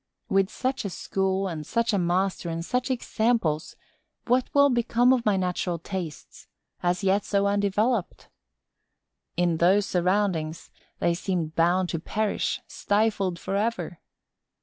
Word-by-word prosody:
With 195 0 +2
such 260 +3 -2
a 200 - -3
school 190 +1 -1
and 160 -4 -4
such 230 +7 0
a 200 - +2
master 180 0 0
and 165 0 -4
such 250 +5 -1
examples, 225 -10 0 0.5
what 250 +1 +2
will 285 -1 +5
become 240 +1 +3
of 240 -4 0
my 205 -2 +3
natural 180 -1 -1
tastes, 170 -3 -7 0.3
as 180 +2 0
yet 195 +1 +2
so 200 -1 +1
undeveloped? 205 +2 0 1.1
In 175 -2 +2
those 190 +5 +4
surroundings, 180 -4 0 0.3
they 170 - +1
seem 175 -2 -2
bound 175 +3 +2
to 165 - -2
perish, 210 +5 -1
stifled 205 -4 0
forever. 195 -3 -2
195 Hz, 130 wpm, -26 LUFS, 175-220 Hz, 1.1 s, will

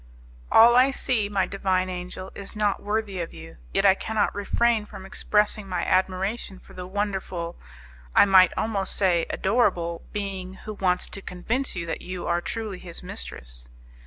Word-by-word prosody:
"All 235 +2 +8
I 255 +2 +6
see, 245 -6 0
my 200 -2 +1
divine 190 -2 0
angel, 180 +1 -6
is 200 +1 -8
not 210 -2 +1
worthy 205 -3 -2
of 165 - -6
you; 80 -3 -11
yet 195 - +1
I 195 - +8
cannot 220 +2 0
refrain 220 +2 +1
from 190 - -10
expressing 210 0 +1
my 180 - -1
admiration 190 +2 0
for - - -17
the 180 0 -7
wonderful, 190 -4 -3 0.6
I - - +8
might 190 -2 +7
almost 200 -4 -1
say 175 -4 +2
adorable, 185 -6 +1
being 190 -2 -4
who 215 - -8
wants 180 -3 0
to 195 - -7
convince 225 +10 -2
you 170 -2 -3
that 165 - -4
you 180 0 -6
are 175 0 +1
truly 215 -2 -4
his 170 -2 -7
mistress." - - -6
190 Hz, 165 wpm, -25 LUFS, 180-210 Hz, 0.6 s, All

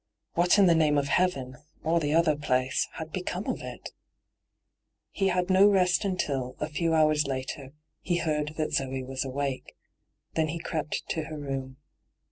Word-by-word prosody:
What 175 +4 +4
in 200 - +6
the 175 - +6
name 155 -3 +3
of 140 -1 0
heaven, 135 -9 0 0.3
or 165 +2 +2
the 145 -2 -1
other 165 -2 +4
place, 130 -3 0
had 160 0 -7
become 180 +2 -3
of - - -2
it? - - -8 1.2
He 195 - 0
had 180 0 +1
no 190 +2 +7
rest 185 -1 +3
until, 140 -10 -2
a 150 - -1
few 165 +1 0
hours 155 -1 +3
later, 135 +1 -5 0.3
he 175 - 0
heard 155 -2 -1
that 155 -1 -1
Zoe 135 -1 -1
was 130 0 -3
awake. 135 0 -4 0.6
Then 160 -1 +1
he 160 +2 -3
crept 155 -2 -3
to 160 -2 -2
her 155 0 -7
room. 135 -2 -5
155 Hz, 170 wpm, -28 LUFS, 135-170 Hz, 1.2 s, no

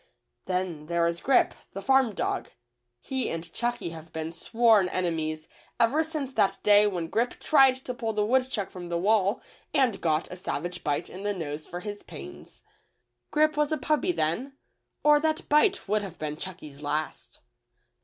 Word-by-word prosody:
Then 180 -5 -2
there 170 0 +1
is 170 0 -1
Grip, 270 -1 +3 0.2
the 195 - -5
farm 265 -5 +3
dog. - - -2 0.5
He 260 - -2
and 165 0 -6
Chucky 240 -7 -2
have 160 0 -10
been 160 0 -4
sworn 225 -1 +3
enemies 160 -4 -2 0.3
ever 275 +8 +3
since 305 -4 -4
that 195 -4 +2
day 210 0 +6
when 180 -5 -2
Grip 230 +9 -1
tried 270 -4 +5
to 250 - -3
pull 235 -3 -2
the 210 -1 0
wood 255 +3 +2
chuck 205 -7 -3
from 175 -2 -8
the 170 - 0
wall 200 +3 +2 0.3
and 255 -8 +2
^ot 160 -1 +1
a 180 - -6
savage 175 0 -4
bite 145 -1 -1
in 185 - -9
the 205 0 -1
nose 155 -3 -5
for 175 +1 -6
his 205 0 -6
pains. - - -11 0.7
Grip 310 0 +3
was 300 0 +1
a 310 - +1
puppy 305 +5 +1
then, 250 - -1 0.5
or 295 0 +6
that 315 +1 -1
bite 330 - +3
would 210 +1 +1
have 190 -4 -7
been 150 -1 -3
Ckucky's 155 -4 -8
last. 150 +1 -4
200 Hz, 175 wpm, -27 LUFS, 170-260 Hz, 0.7 s, day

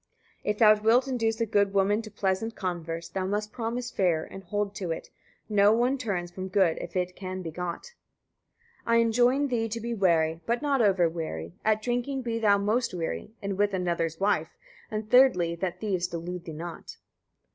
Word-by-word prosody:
132. - - -4
If 210 - 0
thou 215 -1 +6
wilt 240 +4 +4
induce 225 -3 0
a 230 - +2
good 200 -2 +1
woman 200 +3 +3
to 220 - -9
pleasant 205 +2 -1
converse, 170 -3 -4
thou 185 -1 -3
must 210 +2 -2
promise 240 +1 -3
fair, 175 -5 +1
and 195 - -10
hold 205 +2 -2
to 190 -3 -5
it: 165 - -5 0.4
no 205 -1 +5
one 245 +4 +2
turns 180 -7 -3
from 185 +1 -5
good 185 -3 +2
if 170 - -8
it 180 0 -1
can 185 -1 -5
be 165 - -5
got. 180 - -5 0.9
133. 230 - +1
I - - +6
enjoin 240 +5 +3
thee 225 -2 0
to 230 +2 -3
be 235 +1 -3
wary, 165 -5 +2
but 235 +4 0
not 280 -3 +2
over 190 -5 +4
wary; 85 - -5
at 215 0 +2
drinking 245 +3 -1
be 230 -1 -2
thou 205 -2 +4
most 210 +1 0
wary, 165 - -4
and 200 -1 -3
with 205 -1 +2
another's 170 -3 -1
wife; 195 -5 0 0.3
and 215 0 -4
thirdly, 245 -10 +5
that 180 0 -3
thieves 185 -4 -1
delude 175 +1 -6
thee 165 - -6
not. 165 +2 -8
200 Hz, 195 wpm, -27 LUFS, 175-225 Hz, 0.9 s, thou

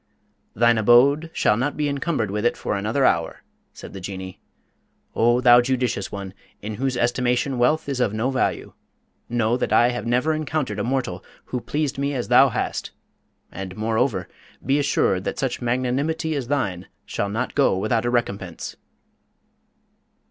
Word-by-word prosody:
"Thine 120 +1 +4
abode 135 +8 +5
shall 105 - +2
not 130 +6 -2
be 150 -1 0
encumbered 140 - -1
with 105 +1 -2
it 120 - +1
for - - -2
another 110 +7 0
hour," 85 -1 0 0.3
said - - -11
the 95 - -7
Jinnee. 95 0 -7 0.7
"O 120 +2 +3
thou 120 -1 +7
judicious 125 -5 -1
one, 100 -2 -6 0.3
in 105 0 -6
whose 135 -2 0
estimation 125 +2 0
wealth 150 +6 +2
is 135 -3 -2
of 120 -5 +2
no 110 +5 -1
value, 130 - -1 0.6
know 120 -1 +1
that - - -2
I 120 - +5
have 120 -2 -4
never 125 +7 +2
encountered 150 -8 -2
a - - -1
mortal 120 -7 -2 0.2
who 125 - -4
pleased 145 0 -2
me 140 0 -1
as 125 - -3
thou - - +6
hast; - - -3 0.6
and 95 -1 -7
moreover, 110 -3 0 0.4
be 135 +3 +2
assured 115 -9 +1
that - - -3
such 135 -2 -2
magnanimity 130 +7 -1
as 135 -4 -3
thine 100 -11 -2 0.2
shall 100 - -2
not 115 +5 -3
go 140 -9 +3
without 110 +3 0
a 120 - 0
recompense!" 100 -8 -3
120 Hz, 165 wpm, -23 LUFS, 105-135 Hz, 0.7 s, thou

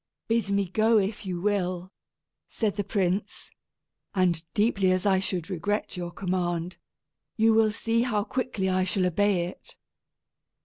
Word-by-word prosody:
"Bid 225 -3 +1
me 200 -1 +1
go 220 +5 +3
if 205 0 -1
you 180 -2 -2
will," 185 -2 -1 0.6
said 215 -3 -1
the 205 - -1
prince, 195 0 -2 0.6
"and 175 -4 +2
deeply 205 -3 +2
as 185 +1 +1
I 190 -2 +4
should 185 -3 -2
regret 200 +3 -2
your 175 -1 -4
command, 175 -1 -2 0.6
you 225 0 +5
will 220 -1 +4
see 230 +2 0
how 225 -4 0
quickly 230 -5 -2
I 185 0 +2
shall 185 0 +1
obey 180 0 +2
it. 180 - -10
195 Hz, 145 wpm, -27 LUFS, 180-210 Hz, 0.6 s, you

